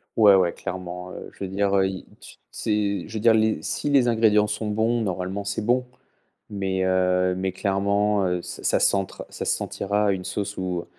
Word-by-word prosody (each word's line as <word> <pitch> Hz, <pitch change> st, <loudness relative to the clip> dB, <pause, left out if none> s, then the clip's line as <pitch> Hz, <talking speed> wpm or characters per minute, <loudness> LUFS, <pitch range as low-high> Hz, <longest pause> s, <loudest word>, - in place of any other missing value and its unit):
Ouais 105 Hz, -3 st, +7 dB
ouais 90 Hz, -3 st, +4 dB
clairement, 90 Hz, -1 st, -6 dB
heu, -, -, -8 dB
je -, -, -8 dB
veux -, -, -2 dB
dire, 100 Hz, +1 st, 0 dB
heu, 95 Hz, 0 st, +3 dB
i 95 Hz, -1 st, -6 dB, 0.2 s
tu -, -, -13 dB
c'est 105 Hz, -3 st, -1 dB
je 110 Hz, -, -12 dB
veux 110 Hz, -, -2 dB
dire 115 Hz, +1 st, +5 dB
les 110 Hz, 0 st, +2 dB
si 145 Hz, -, -2 dB
les 135 Hz, -4 st, +4 dB
ingrédients 110 Hz, -2 st, +3 dB
sont 105 Hz, +1 st, -3 dB
bons 110 Hz, +3 st, +1 dB
normalement 95 Hz, 0 st, -3 dB
c'est 100 Hz, +2 st, -3 dB
bon 125 Hz, +3 st, +1 dB, 0.6 s
mais 95 Hz, -2 st, -2 dB
heu, 90 Hz, 0 st, +2 dB
mais 95 Hz, 0 st, -2 dB
clairement, 100 Hz, +1 st, +1 dB
heu, 90 Hz, -1 st, 0 dB
ç -, -, -8 dB
ça -, -, +2 dB
s'entre 95 Hz, -1 st, 0 dB
ça -, -, -6 dB
se -, -, +2 dB
sentira 100 Hz, +1 st, -1 dB
une 95 Hz, -1 st, -3 dB
sauce 100 Hz, 0 st, -4 dB
où 90 Hz, -2 st, -3 dB
100 Hz, 200 wpm, -24 LUFS, 95-105 Hz, 0.6 s, Ouais